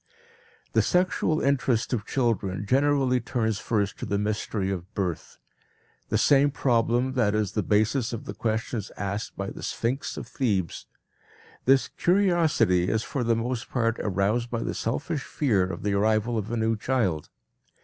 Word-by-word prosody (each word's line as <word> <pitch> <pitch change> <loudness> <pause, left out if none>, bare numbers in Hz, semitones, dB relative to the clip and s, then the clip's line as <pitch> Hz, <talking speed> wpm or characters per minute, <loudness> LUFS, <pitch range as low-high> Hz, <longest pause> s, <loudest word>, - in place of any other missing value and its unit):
The - - +4
sexual 180 -3 +1
interest 130 -4 +1
of 110 -4 -2
children 105 -7 0
generally 135 +1 +2
turns 110 -3 -1
first 105 -4 -1
to - - -4
the 100 - 0
mystery 105 -1 -1
of 95 +1 -5
birth 90 -5 -3 0.7
the - - +2
same 140 0 +5
problem 125 -1 +1
that 110 -5 +2
is 105 -3 0
the 105 - 0
basis 110 +5 +1
of 115 - -5
the 100 - -5
questions 110 0 -2
asked 100 +1 -4
by - - -3
the - - -9
sphinx 125 +4 -2
of - - -5
Thebes. 100 - -1 0.8
This 135 +1 +4
curiosity 165 - +2
is 110 0 0
for 135 - -3
the 115 0 +2
most 120 +1 -3
part 115 -2 0
aroused 105 +4 0
by 115 -1 -2
the - - -2
selfish 140 +6 -2
fear 110 -13 +1
of 95 - -6
the 100 0 0
arrival 110 +3 +2
of 110 -1 -2
a 120 - -1
new 110 0 +1
child. 105 - -1
115 Hz, 160 wpm, -26 LUFS, 105-130 Hz, 0.8 s, same